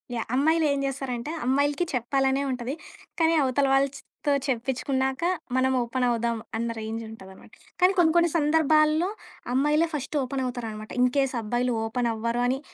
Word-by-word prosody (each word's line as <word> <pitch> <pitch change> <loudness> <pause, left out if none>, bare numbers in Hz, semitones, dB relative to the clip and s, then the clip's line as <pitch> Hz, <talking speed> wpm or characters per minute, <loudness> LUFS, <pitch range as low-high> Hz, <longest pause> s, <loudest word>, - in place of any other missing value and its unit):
Yeah! 230 - -2
అమ్మాయిలు 315 +4 +3
ఏం 280 - -1
చేస్తారంటే, 270 0 -3
అమ్మాయిలకి 285 +5 +1
చెప్పాలనే 270 +2 +1
ఉంటది. 250 +1 -3 0.5
కానీ, 325 0 +4
అవతల 275 +1 +1
వాళ్ళతో 275 +1 -1 0.2
చెప్పించుకున్నాక 265 +2 -1 0.3
మనం 260 0 +2
ఓపెనవుదాం 235 -1 0 0.2
అన్న 235 +1 -2
రేంజుంటదనమాట. 220 -3 -8 0.3
కానీ 365 +2 +5
కొన్ని, 320 -2 +5
కొన్ని 340 0 +4
సందర్భాల్లో 310 +2 +3 0.4
అమ్మాయిలే 295 +5 +3
ఫస్టు 295 +1 -3
ఓపెనవుతారనమాట. 245 -5 -4
ఇన్‌కేస్ 260 +1 +2
అబ్బాయిలు 240 +2 -1
ఓపెన్ 240 +1 -1
అవ్వరు 235 +2 -1
అని 260 +2 0
260 Hz, 125 wpm, -26 LUFS, 240-290 Hz, 0.5 s, కానీ